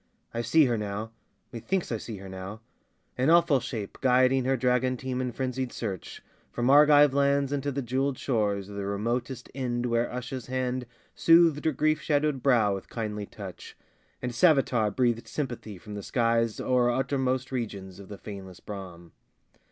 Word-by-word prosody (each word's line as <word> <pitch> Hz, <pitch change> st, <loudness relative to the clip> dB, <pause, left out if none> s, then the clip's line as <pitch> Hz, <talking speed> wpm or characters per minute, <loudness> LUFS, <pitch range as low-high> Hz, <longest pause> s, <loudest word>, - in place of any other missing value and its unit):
I 115 Hz, -, -1 dB
see 140 Hz, +7 st, +4 dB
her 120 Hz, -3 st, 0 dB
now, 105 Hz, +2 st, -4 dB, 0.4 s
Methinks 150 Hz, -, -2 dB
I 115 Hz, -, 0 dB
see 110 Hz, 0 st, -7 dB
her 95 Hz, 0 st, -10 dB
now, 95 Hz, +3 st, -7 dB, 0.6 s
an 130 Hz, +4 st, +3 dB
awful 165 Hz, -4 st, +5 dB
shape 110 Hz, -6 st, -6 dB
Guiding 130 Hz, 0 st, +4 dB
her 135 Hz, 0 st, +2 dB
dragon 125 Hz, +1 st, +1 dB
team 130 Hz, 0 st, -3 dB
in 125 Hz, -1 st, -2 dB
frenzied 130 Hz, 0 st, -3 dB
search 95 Hz, -6 st, -6 dB, 0.3 s
From 120 Hz, +2 st, +1 dB
Argive 145 Hz, -1 st, +7 dB
lands 140 Hz, 0 st, +2 dB
unto 145 Hz, 0 st, -1 dB
the 140 Hz, 0 st, -3 dB
jeweled 130 Hz, +2 st, -1 dB
shores 105 Hz, -6 st, -1 dB
Of 100 Hz, 0 st, -9 dB
the 100 Hz, -, -3 dB
remotest 120 Hz, +5 st, -3 dB
Ind 125 Hz, -2 st, -2 dB
where 120 Hz, 0 st, +1 dB
Usha's 125 Hz, 0 st, -5 dB
hand 130 Hz, -1 st, -2 dB, 0.3 s
Soothed 165 Hz, -3 st, +5 dB
her 160 Hz, -, +3 dB
grief 155 Hz, +2 st, +1 dB
shadowed 150 Hz, -3 st, +1 dB
brow 115 Hz, -7 st, +3 dB
with 95 Hz, -, -6 dB
kindly 105 Hz, -3 st, -4 dB
touch, 95 Hz, -4 st, -10 dB, 0.5 s
And 125 Hz, -, -1 dB
Savitar 130 Hz, -7 st, +3 dB
breathed 120 Hz, 0 st, 0 dB
sympathy 120 Hz, -8 st, -5 dB
from 105 Hz, +4 st, -10 dB
the 100 Hz, -, -5 dB
skies 115 Hz, 0 st, +1 dB
O'er 125 Hz, -1 st, +2 dB
uttermost 130 Hz, 0 st, 0 dB
regions 100 Hz, -7 st, -5 dB
of 100 Hz, -, -11 dB
the 100 Hz, -, -7 dB
faneless 95 Hz, -4 st, -9 dB
Brahm. 90 Hz, -5 st, -9 dB
125 Hz, 165 wpm, -27 LUFS, 105-135 Hz, 0.6 s, Argive